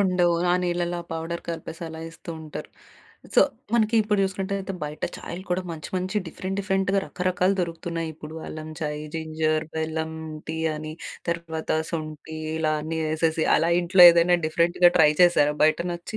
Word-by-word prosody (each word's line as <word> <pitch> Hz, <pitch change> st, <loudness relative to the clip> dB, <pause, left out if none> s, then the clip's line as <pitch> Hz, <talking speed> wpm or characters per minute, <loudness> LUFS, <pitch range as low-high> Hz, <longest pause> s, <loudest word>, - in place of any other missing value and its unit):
ఉండవు. 180 Hz, -3 st, +3 dB, 0.2 s
ఆ -, -, +4 dB
నీళ్ళలో 175 Hz, 0 st, -1 dB
ఆ -, -, -23 dB
పౌడర్ 165 Hz, +1 st, -4 dB
కలిపేసి 165 Hz, 0 st, -6 dB
అలా 160 Hz, 0 st, -8 dB
ఇస్తూ 165 Hz, +1 st, -10 dB
ఉంటారు. 155 Hz, -1 st, -8 dB, 0.6 s
సో, -, -, +7 dB, 0.3 s
మనకి 220 Hz, 0 st, +3 dB
ఇప్పుడు 210 Hz, -1 st, 0 dB
చూసుకున్నట్టయితే 195 Hz, 0 st, -3 dB
బయట 150 Hz, +1 st, -7 dB
చాయలు 180 Hz, +2 st, -7 dB
కూడా 180 Hz, +1 st, +1 dB
మంచి 155 Hz, -2 st, -6 dB
మంచి 185 Hz, +3 st, -2 dB
డిఫరెంట్ 185 Hz, +4 st, -5 dB
డిఫరెంట్‌గా 195 Hz, 0 st, +1 dB
రకరకాలు 185 Hz, +1 st, +1 dB
దొరుకుతున్నాయి. 165 Hz, -1 st, -3 dB
ఇప్పుడు 155 Hz, 0 st, -10 dB
అల్లం 155 Hz, 0 st, -7 dB
చాయ్, 150 Hz, -1 st, -3 dB
జింజర్, 155 Hz, 0 st, 0 dB
బెల్లం 160 Hz, 0 st, -2 dB, 0.4 s
టీ 160 Hz, -, -3 dB, 0.2 s
అని, 155 Hz, 0 st, -6 dB, 0.4 s
తర్వాత 165 Hz, -1 st, -3 dB, 0.2 s
శొంఠి, 155 Hz, -1 st, -5 dB, 0.2 s
ఇలా 155 Hz, -1 st, +1 dB
అన్నీ 160 Hz, +1 st, -3 dB
ఏసేసి 160 Hz, 0 st, +1 dB
అలా 165 Hz, +1 st, +2 dB
ఇంట్లో 180 Hz, +1 st, +5 dB
ఏదైనా 170 Hz, +1 st, +4 dB
డిఫరెంట్‌గా 175 Hz, +2 st, +4 dB
ట్రై 150 Hz, -2 st, +7 dB
చేసారా 150 Hz, -4 st, +4 dB
బయటనచ్చి? 170 Hz, +2 st, 0 dB
170 Hz, 150 wpm, -25 LUFS, 160-180 Hz, 0.6 s, సో